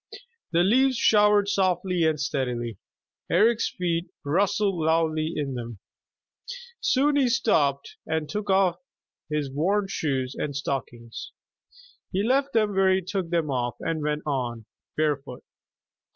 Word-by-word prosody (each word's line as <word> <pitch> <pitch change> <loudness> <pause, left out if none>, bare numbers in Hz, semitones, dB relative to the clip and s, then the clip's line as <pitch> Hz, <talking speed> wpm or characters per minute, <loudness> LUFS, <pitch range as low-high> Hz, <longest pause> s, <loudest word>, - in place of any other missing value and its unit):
The 170 0 +3
leaves 255 +6 +3
showered 210 -2 +4
softly 185 -3 +1
and 155 -2 +1
steadily. 125 - -2 0.5
Eric's 230 +1 +3
feet 170 -1 -2 0.2
rustled 195 +2 +1
loudly 160 0 +1
in 140 -3 -2
them. 120 -3 -6 1.0
Soon 285 +2 +2
he 265 -3 +3
stopped 145 - +1
and 160 -1 -1
took 205 +5 -4
off 190 -2 +3 0.5
his 150 -3 -2
worn 195 +9 +1
shoes 135 -7 -2
and 145 -2 -3
stockings. 120 -4 -5 0.8
He 195 +1 0
left 270 +4 +2
them 215 -2 +2
where 190 -1 +3
he 190 0 +2
took 185 -2 -3
them 165 -4 0
off 120 -2 -1
and 165 -1 -2
went 150 0 -2
on, 120 -6 -3 0.3
barefoot. 145 -4 -1
165 Hz, 130 wpm, -25 LUFS, 140-200 Hz, 1.0 s, showered